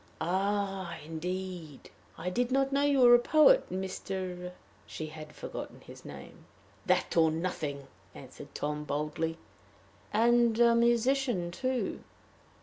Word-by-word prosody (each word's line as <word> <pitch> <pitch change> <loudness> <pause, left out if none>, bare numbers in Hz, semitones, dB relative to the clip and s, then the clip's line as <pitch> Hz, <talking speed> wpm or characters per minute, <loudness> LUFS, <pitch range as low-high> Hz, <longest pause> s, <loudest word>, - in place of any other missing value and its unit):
"Ah! 190 0 -1
indeed! 175 -1 -6 0.3
I 180 +2 -3
did 245 +5 0
not 270 +1 +2
know 280 +1 +2
you 285 -2 +3
were 240 -1 +8
a 240 - +8
poet, 310 - +5
Mr. 185 -1 -4 0.2
" - - -30
She 155 - -6
had 155 0 -9
forgotten - - -7
his - - -13
name. - - -11 0.4
"That - - +1
or 160 -1 +5
nothing," 155 -4 -3 0.3
answered - - -12
Tom, 150 0 -3
boldly. 150 +3 -2 0.7
"And 235 +1 +3
a 235 -1 +6
musician, 235 -4 +2
too?" 255 +6 -2
190 Hz, 130 wpm, -30 LUFS, 165-240 Hz, 0.7 s, were